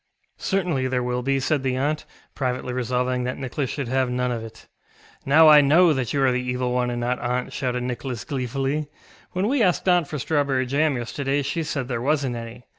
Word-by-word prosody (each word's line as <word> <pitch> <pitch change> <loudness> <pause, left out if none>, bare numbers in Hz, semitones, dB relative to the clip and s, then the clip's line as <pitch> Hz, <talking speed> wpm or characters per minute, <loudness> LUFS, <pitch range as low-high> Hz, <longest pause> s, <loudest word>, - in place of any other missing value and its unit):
ŌĆ£Certainly 175 -10 0
there 125 -1 0
will 125 0 -1
be, 135 +2 +1
ŌĆØ - - -2
said 150 -1 +1
the 130 -1 -1
aunt, 145 +4 -1 0.3
privately 125 -1 -2
resolving 125 0 -1
that 125 - -3
Nicholas 135 0 -3
should 140 -4 -3
have 130 +1 +1
none 125 0 -1
of 115 -2 -3
it. 110 0 -11 0.6
ŌĆ£Now 155 +3 +7
I 150 -1 +9
know 160 +4 +5
that 130 -4 -2
you 140 -1 +1
are 130 - +4
the 125 0 0
Evil 125 0 -2
One 125 0 +1
and 120 0 -3
not 120 +1 -1
aunt, 125 +1 -2
ŌĆØ - - -13
shouted 125 -1 -2
Nicholas 125 -2 -4
gleefully; 135 +3 -2 0.5
ŌĆ£when 185 +3 +1
we 265 +1 +1
asked 185 -2 +2
aunt 175 -4 +4
for 150 - -4
strawberry 140 -2 0
jam 140 +2 +1
yesterday 135 +4 -2
she 140 +5 -2
said 145 -5 -3
there 120 -3 -3
wasnŌĆÖt 140 -2 0
any. 115 +1 -8
130 Hz, 215 wpm, -23 LUFS, 125-145 Hz, 0.6 s, I